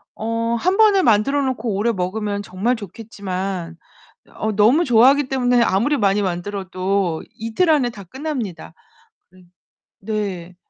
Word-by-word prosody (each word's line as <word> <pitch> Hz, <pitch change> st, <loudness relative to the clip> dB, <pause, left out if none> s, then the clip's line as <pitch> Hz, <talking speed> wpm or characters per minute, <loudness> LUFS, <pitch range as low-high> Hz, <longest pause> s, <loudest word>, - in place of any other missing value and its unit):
어 230 Hz, +1 st, -2 dB
한번에 390 Hz, -, +3 dB
만들어 230 Hz, +6 st, +3 dB
놓고 245 Hz, -5 st, -2 dB
오래 215 Hz, +4 st, +1 dB
먹으면 205 Hz, +1 st, -3 dB
정말 205 Hz, +5 st, -1 dB
좋겠지만 190 Hz, -5 st, -6 dB, 0.6 s
어 220 Hz, -, -2 dB
너무 225 Hz, -, +4 dB
좋아하기 260 Hz, +3 st, +4 dB
때문에 245 Hz, -2 st, +2 dB
아무리 235 Hz, +8 st, +2 dB
많이 205 Hz, -2 st, +2 dB
만들어도 185 Hz, -1 st, -2 dB
이틀 230 Hz, +11 st, 0 dB
안에 275 Hz, -6 st, +3 dB
다 205 Hz, -4 st, -11 dB
끝납니다. 230 Hz, -, -6 dB, 0.6 s
음. 185 Hz, -1 st, -21 dB, 0.5 s
네. 195 Hz, -4 st, -4 dB
215 Hz, 280 characters per minute, -20 LUFS, 190-245 Hz, 0.6 s, 너무